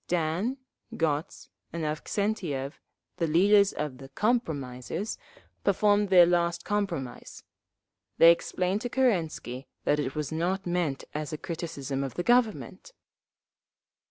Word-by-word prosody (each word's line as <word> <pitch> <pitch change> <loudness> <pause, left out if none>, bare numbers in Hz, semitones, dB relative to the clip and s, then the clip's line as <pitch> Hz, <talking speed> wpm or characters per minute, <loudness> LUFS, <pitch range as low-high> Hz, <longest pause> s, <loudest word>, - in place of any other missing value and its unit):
Dan, 175 +9 0 0.4
Gotz 160 +1 -2 0.2
and 165 -1 -4
Avksentiev, 155 -3 -2 0.4
the 165 - 0
leaders 200 +5 +5
of 145 -4 -4
the 135 -1 -10
"compromisers," 160 - -2 0.4
performed 205 +1 +3
their 180 -2 +8
last 170 0 +1
compromise…. 185 -12 -3 0.7
They 165 - +9
explained 185 +3 -1
to 245 - -3
Kerensky 165 - 0 0.2
that 150 - +2
it 140 -2 -2
was 150 -1 -3
not 180 +4 -1
meant 175 -6 -1
as 150 +1 -4
a 155 - -3
criticism 145 -5 -4
of 135 - -5
the 175 - -2
Government! 240 - +1
170 Hz, 120 wpm, -28 LUFS, 150-200 Hz, 0.7 s, They